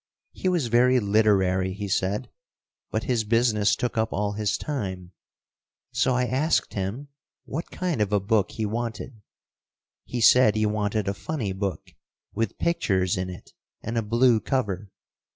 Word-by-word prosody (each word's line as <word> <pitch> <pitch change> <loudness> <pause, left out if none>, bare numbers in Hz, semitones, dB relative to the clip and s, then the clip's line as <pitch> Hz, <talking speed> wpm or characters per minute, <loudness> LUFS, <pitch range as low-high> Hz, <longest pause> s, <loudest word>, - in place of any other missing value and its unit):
He 185 - -2
was 175 -7 +1
very 125 +2 +4
literary, 100 -3 +2
he 100 +1 -5
said, 95 +1 -1 0.6
but - - -2
his 120 -5 0
business 110 -2 +2
took 120 -2 -2
up 110 - 0
all 105 0 -1
his 105 0 -1
time, 95 -11 -4 0.8
so 130 - +1
I 125 0 +2
asked 135 +6 +1
him 105 +9 -4 0.4
what 160 +5 -5
kind 175 -10 -2
of 105 -1 0
a 105 - +3
book 100 0 +1
he 110 - -2
wanted. 115 +1 -4 0.8
He 125 - -4
said 120 -1 +6
he 110 0 +2
wanted 105 -1 -1
a 100 - 0
funny 100 +1 -3
book, 95 -4 -4 0.4
with 115 +2 -2
pictures 95 - +1
in 90 0 -3
it 90 - -11 0.3
and 115 - -4
a 115 - +2
blue 115 +2 +3
cover. 105 -6 -2
110 Hz, 155 wpm, -25 LUFS, 100-125 Hz, 0.8 s, said